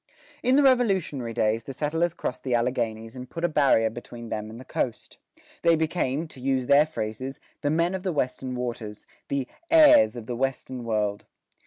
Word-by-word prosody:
In 255 +1 +3
the 290 - +5
Revolutionary 195 - +2
days, 110 0 0
the 135 - -6
settlers 160 +5 -1
crossed 125 - -4
the 125 -2 +1
Alleghanies 115 -2 -1
and 125 0 -8
put 165 +6 -2
a - - +4
barrier 135 -8 +3
between 120 0 -9
them 110 0 -4
and 115 +2 -9
the 130 - -11
coast. 120 - -4 0.4
They 170 -1 +5
became, 160 -2 -1
to 130 - -12
use 130 -1 0
their 145 +3 +5
phrases, 130 -1 -5 0.2
"the 145 - 0
men 170 +4 +1
of 190 - -3
the 185 -1 -1
Western 130 -3 -2
waters," 115 -4 -5 0.2
the 140 -2 -2 0.2
heirs 300 - +7
of 120 -2 -7
the 120 - -4
"Western 130 0 -3
world." 105 -2 -1
130 Hz, 185 wpm, -26 LUFS, 115-160 Hz, 0.4 s, heirs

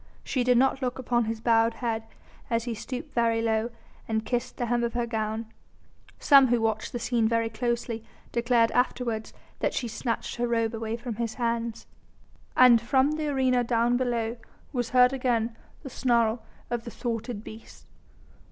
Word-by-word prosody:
She 255 - 0
did 250 0 +4
not 270 +2 +3
look 250 -1 -2
upon 240 -2 +1
his 220 0 -4
bowed 230 -1 +3
head 230 -2 -2 0.5
as 230 -1 +1
he 240 -1 -3
stooped 250 +3 -6
very 230 -1 +2
low 225 0 0 0.4
and 220 -1 -1
kissed 245 +1 -2
the 245 - -1
hem 240 0 0
of 235 - -1
her 240 -1 0
gown; 220 -1 -2 0.7
some 275 -3 +6
who 240 -1 +2
watched 220 -1 -1
the - - -3
scene 235 -1 +1
very 230 0 +1
closely 235 0 -2 0.3
declared 235 -1 +2
afterwards 240 -3 -1 0.3
that - - 0
she 245 - -1
snatched 230 +2 -3
her 240 0 0
robe 230 -1 0
away 225 0 -3
from 235 -2 -6
his 230 -2 -2
hands. 230 -1 -2 0.7
And 245 -2 +7
from 265 +4 +2
the 305 0 -2
arena 260 -3 +2
down 235 0 +2
below 240 -2 -1 0.4
was 245 -3 -1
heard 250 +1 +5
again 235 -3 0 0.3
the 270 - -6
snarl 235 -3 +1 0.3
of 240 -1 -1
the 235 - -7
thwarted 230 -2 -4
beast. 220 0 -12
235 Hz, 170 wpm, -27 LUFS, 225-245 Hz, 0.7 s, And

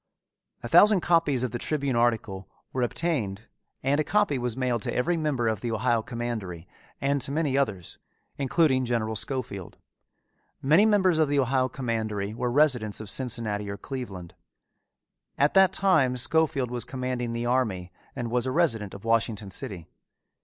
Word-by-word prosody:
A - - -3
thousand 205 -3 +6
copies 165 -8 +2
of 125 - -2
the 120 - -4
Tribune 140 -3 -1
article 110 -5 0 0.2
were 130 - -1
obtained 120 - -2 0.4
and 140 +3 +2
a - - +3
copy 205 -7 +1
was 120 -1 -3
mailed 125 -3 0
to - - -3
every 170 +8 +1
member 150 -7 -1
of 110 -3 -1
the 120 - -3
Ohio 115 +1 +1
Commandery 110 -8 -5 0.3
and 140 0 0
to 135 - -5
many 150 -2 0
others, 105 -11 -2 0.4
including 135 -1 +2
General 115 -3 -1
Schofield. 105 -6 -4 0.8
Many 160 +10 +4
members 190 -6 +3
of 155 -2 +3
the 145 - +1
Ohio 130 -1 +2
Commandery 110 -5 -3
were 120 +2 -2
residents 125 -7 +2
of 110 -2 -4
Cincinnati 110 -5 -2
or 100 - -5
Cleveland. 100 -11 -7 1.0
At 145 +1 +3
that 190 -1 +6
time 150 -10 +2
Schofield 135 -2 +1
was 120 -2 -1
commanding 125 -2 -3
the 115 +1 -3
army 110 -8 0 0.2
and 120 -2 -4
was 125 +1 +1
a - - -1
resident 115 - 0
of 100 - -11
Washington 110 -3 0
City. 95 - -6
125 Hz, 160 wpm, -26 LUFS, 110-140 Hz, 1.0 s, thousand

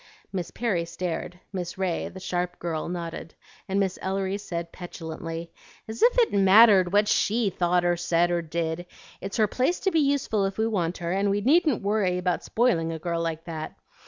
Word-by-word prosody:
Miss 180 -3 -3
Perry 210 -8 -1
stared; 175 +1 -4
Miss 180 -2 -4
Ray, 185 -3 -1
the 190 - -10
sharp 180 -1 -2
girl, 165 -1 -3
nodded, 170 -2 -6 0.3
and 195 +1 +1
Miss 190 -2 -1
Ellery 195 +1 -2
said 170 -4 -5
petulantly, 165 -1 -7 0.4
"As 220 +1 -7
if - - +5
it 475 -2 +3
mattered 195 -1 +6
what 205 +1 +3
SHE 215 -1 +2
thought 175 0 +1
or 175 0 +3
said 175 0 +1
or 175 -1 +1
did! 165 +1 -3 0.3
It's 195 +3 -4
her 220 - +4
place 260 - 0
to 385 - +1
be 325 - +3
useful 275 -8 +1
if 195 0 -3
we 220 - +1
want 180 -6 -1
her, 170 -1 -3
and 195 +2 +1
we 200 +1 +1
needn't 295 - +3
worry 200 -3 +1
about 180 -1 -1
spoiling 175 -9 +1
a 165 - -4
girl 170 +1 -2
like 165 -1 -3
that. 160 -2 -6
180 Hz, 190 wpm, -26 LUFS, 170-205 Hz, 0.4 s, mattered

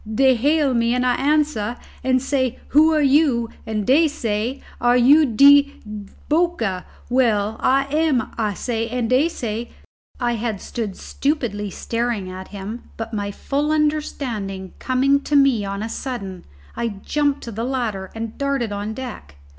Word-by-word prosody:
Dey 265 +4 +4
hail 285 +3 +2
me 235 0 +2
an' 250 - +1
I 250 - +3
answer 275 -6 0 0.3
and 255 0 +3
say 260 -2 -1
who 310 +3 +5
are 305 -2 +2
you, 270 -5 +3 0.2
and 215 -2 -2
dey 305 +7 +5
say 235 -3 -2 0.2
are 245 0 +4
you 285 +5 +6
de 280 +4 +6 0.5
Boca? 300 - 0 0.2
We 255 +1 +3
am, 260 +6 +1
I 210 -3 -1
say, 230 +1 -2
and 245 -1 -1
dey 275 +6 +4
say 235 -6 -4 0.3
" - - -32
I 240 -1 +1
had 220 -3 -3
stood 210 -3 -5
stupidly 240 -9 -2
staring 230 -3 -3
at 185 0 -8
him, 205 +4 -8
but 225 0 -6
my 205 -1 -2
full 285 +8 -2
understanding 255 -11 -2
coming 270 +2 +2
to 295 - -1
me 275 -6 +4
on 200 +1 -4
a - - -3
sudden, 200 -8 -5 0.3
I 235 - -1
jumped 285 +7 -1
to 235 - -6
the 225 +2 -4
ladder 235 -7 -2
and 225 0 -5
darted 275 -5 -1
on 205 +2 -4
deck. 215 - -8
245 Hz, 160 wpm, -21 LUFS, 215-280 Hz, 0.5 s, you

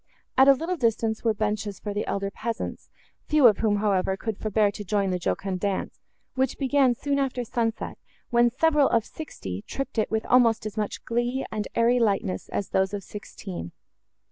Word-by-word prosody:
At 265 +1 +6
a 275 - +9
little 330 +7 -2
distance, 225 -3 0
were 225 -2 +2
benches 210 -1 -2
for 205 - -4
the 205 - -2
elder 195 0 -2
peasants, 230 +2 -5 0.4
few 300 -3 +4
of 215 -4 +7
whom, 215 -2 +2
however, 195 -2 +1
could 220 +1 -3
forbear 215 -1 +2
to 205 - -7
join 200 -1 0
the 180 - -1
jocund 185 +2 -2
dance, 200 0 -2 0.3
which 260 -1 0
began 270 -2 +3
soon 280 +3 -1
after 260 -2 -1
sunset, 225 -1 -2 0.3
when 240 0 +5
several 295 +2 +3
of 230 -1 +2
sixty 95 - -7
tripped 275 -4 -3
it 215 - +1
with 220 0 -1
almost 235 -3 +4
as 215 -1 -5
much 210 -2 -3
glee 240 +3 -1
and 215 -1 -3
airy 235 +2 +4
lightness, 195 - 0
as 200 - -3
those 190 +1 +1
of 200 - -6
sixteen. 190 - -8
220 Hz, 185 wpm, -26 LUFS, 200-250 Hz, 0.4 s, a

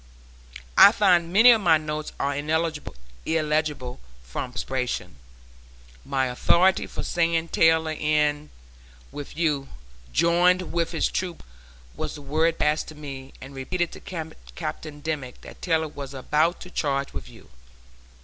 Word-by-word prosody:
I 200 - +11
find 180 -6 +3
many 225 +6 +8
of 225 -2 +4
my 165 -4 +5
notes 155 0 -5
are 140 0 0
illegible 150 - -2 0.2
from 65 - -5
perspiration. 125 - -3 0.9
My 135 -1 0
authority 170 +9 +3
for - - -5
saying 165 -1 0
Taylor 160 0 +4
went 155 - -6
in 150 -1 +1 0.6
with 145 +1 -8
you, 150 -5 0 0.4
"joined 175 - +3
with 170 -1 0
his - - +1
troop" 180 -3 -4 0.5
was - - -4
the 145 - -10
word 160 +4 +1
passed 150 +1 +1
to 155 - -10
me 135 -3 -9
and 135 +1 -10
repeated 170 +6 -2
to - - -10 0.6
Captain 155 -2 -6
Dimmick 145 -5 -4
that - - -13
Taylor 160 -3 +1
was 140 -2 -8
about 155 +6 +1
to 180 - -10
charge 140 -4 -1
with - - -7
you. 65 - -17
155 Hz, 140 wpm, -25 LUFS, 140-170 Hz, 0.9 s, I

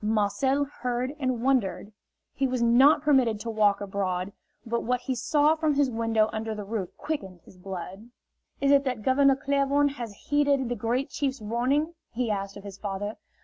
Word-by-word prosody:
Marcel 220 +6 +1
heard 250 -1 -3
and 255 -4 -1
wondered. 240 -6 0 0.4
He 275 - 0
was 255 -1 -2
not 245 +7 +5
permitted 260 -8 +3
to 230 +1 -4
walk 205 -2 +2
abroad, 190 -1 -2 0.3
but 235 0 -1
what 250 +1 -1
he 260 +1 -2
saw 295 +4 +3
from 310 -2 0
his 280 -2 +2
window 225 -1 +1
under 220 0 -3
the 210 - -5
roof 200 -3 -3
quickened 195 - -5
his 180 - -18
blood. 190 +4 -7 0.5
"Is 275 0 +2
it 280 0 +5
that 250 -5 -2
Governor 270 +2 +4
Claiborne 280 +1 +1
has 235 -7 -7
heeded 285 -3 +2
the 245 - -1
Great 245 +5 -1
Chief's 275 -2 -2
warning?" 255 +9 0 0.2
he 235 -1 -2
asked 195 -1 -3
of 200 - -11
his 200 -1 -9
father. 205 +1 -4
240 Hz, 180 wpm, -27 LUFS, 210-275 Hz, 0.5 s, not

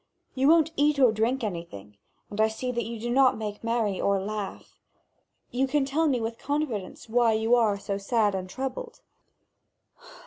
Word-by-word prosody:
You 270 0 +2
won't 325 0 +5
eat 295 +1 +2
or 255 -4 +5
drink 230 +4 0
anything, 170 - -6 0.4
and 205 +1 -1
I 220 - +5
see 235 +3 -4
that 235 -2 -2
you 230 0 -6
do 240 +2 -3
not 260 -1 +4
make 210 -1 -5
merry 225 -4 0
or 200 -1 +2
laugh. 205 0 -6 0.7
You 265 +2 +1
can 280 +1 +1
tell 310 +4 +1
me 260 -4 +1
with 225 0 -4
confidence 275 -12 -3
why 230 0 +3
you 220 +2 +1
are 225 -4 +3
so 200 0 -4
sad 210 0 +1
and 185 -1 -4
troubled." 460 - -5
230 Hz, 175 wpm, -27 LUFS, 210-265 Hz, 0.7 s, won't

